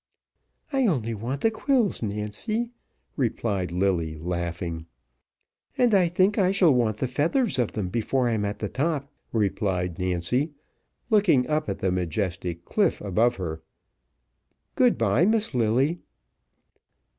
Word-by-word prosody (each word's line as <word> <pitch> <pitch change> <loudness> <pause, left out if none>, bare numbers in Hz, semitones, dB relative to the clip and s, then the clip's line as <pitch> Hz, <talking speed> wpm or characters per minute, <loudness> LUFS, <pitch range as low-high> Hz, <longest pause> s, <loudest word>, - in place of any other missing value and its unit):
"I 270 -3 +3
only 120 - 0
want 120 +6 -4
the 225 - +3
quills, 230 -1 +1
Nancy," 110 - -2 0.4
replied 105 - -1
Lilly, 85 -4 0
laughing. 85 0 -4 0.9
"And 245 -3 +3
I 185 -3 +5
think 185 +5 +2
I 185 -1 +3
shall 185 -6 +4
want 115 -4 +1
the 130 - -1
feathers 150 - +1
of 120 - 0
them 100 -5 -2
before 120 +5 0
I'm 110 -3 0
at 105 0 -2
the 105 - -3
top," 140 - -2 0.2
replied 95 -4 -1
Nancy, 95 - 0 0.6
looking 190 - +4
up 155 -5 0
at 100 - -2
the 95 - 0
majestic 90 -1 -2
cliff - - +1
above 110 +5 +1
her. 80 -5 -5 1.1
"Good 250 -2 +3
bye, 115 - +3
Miss 220 -5 +2
Lilly." 125 +8 +1
115 Hz, 135 wpm, -25 LUFS, -, 1.1 s, I